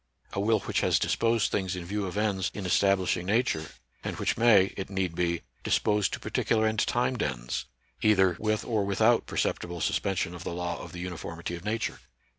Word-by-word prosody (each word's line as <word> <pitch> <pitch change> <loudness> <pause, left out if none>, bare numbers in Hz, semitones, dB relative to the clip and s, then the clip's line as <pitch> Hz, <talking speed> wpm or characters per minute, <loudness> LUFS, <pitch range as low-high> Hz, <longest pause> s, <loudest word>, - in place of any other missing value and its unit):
A - - -2
will 110 +2 +2
which - - -1
has - - +3
disposed 115 -2 +1
things 95 -2 -1
in 90 -1 -6
view 100 +2 -2
of 90 - -5
ends 100 -3 +1
in 100 - -4
establishing 95 -1 +2
Nature, 105 - +1 0.3
and - - -4
which - - 0
may, 105 -5 +5
it 95 - -5
need 95 -3 -1
be, 85 0 -1 0.2
dispose 105 -1 +2
to - - -4
particular 110 -1 +1
and 110 -1 +1
timed 120 0 +1
ends, - - -2 0.4
either 95 -4 +4
with 110 0 0
or 110 -4 +1
without 110 +4 +3
perceptible 85 0 -2
suspension 90 0 0
of 90 0 -8
the - - -4
law 85 -1 -3
of - - -9
the 90 - -8
uniformity 85 -1 -5
of 85 0 -6
Nature. 110 +2 -2
95 Hz, 190 wpm, -28 LUFS, 90-110 Hz, 0.4 s, may